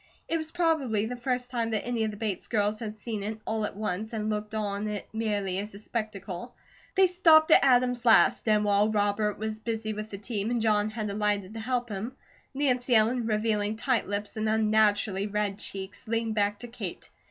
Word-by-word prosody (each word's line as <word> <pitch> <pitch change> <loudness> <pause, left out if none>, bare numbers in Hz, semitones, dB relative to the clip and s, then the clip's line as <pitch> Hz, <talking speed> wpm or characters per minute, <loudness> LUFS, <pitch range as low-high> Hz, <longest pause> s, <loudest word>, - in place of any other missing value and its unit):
It 330 - 0
was 315 0 -4
probably 310 -12 +1
the 245 +2 -4
first 250 0 -2
time 230 -2 -1
that 215 -3 -1
any 240 -2 -1
of 220 - 0
the 210 - -7
Bates 205 -4 -2
girls 210 -1 0
had 220 -2 -6
seen 215 -1 -4
it 215 +2 -4
all 220 -1 -1
at - - -5
once, 215 +1 -3
and 215 -1 -1
looked 210 +1 -3
on 205 -1 -2
it 210 -1 -4
merely 205 -4 -1
as 205 0 -6
a - - -7
spectacle. 215 -1 -5 0.4
They 380 0 +6
stopped 330 -3 +5
at - - +7
Adam's 250 -2 +3
last, 230 0 +5
and 210 -1 +3
while 205 +1 +3
Robert 205 0 +1
was 220 0 -4
busy 220 -1 -3
with 215 +1 -6
the 200 - -6
team 205 0 -3
and 240 0 0
John 215 -1 +2
had 215 -1 -4
alighted 205 -1 0
to 225 - -6
help 245 +1 -1
him, 215 +6 -5 0.4
Nancy 255 -3 +1
Ellen, 225 +2 +3
revealing 215 -1 0
tight 240 +1 0
lips 205 +2 -4
and 215 0 0
unnaturally 215 -2 +2
red 205 -1 -2
cheeks, 190 +1 -7
leaned 225 0 0
back 205 -1 +1
to 240 - -6
Kate. 235 - -7
215 Hz, 205 wpm, -28 LUFS, 210-235 Hz, 0.4 s, at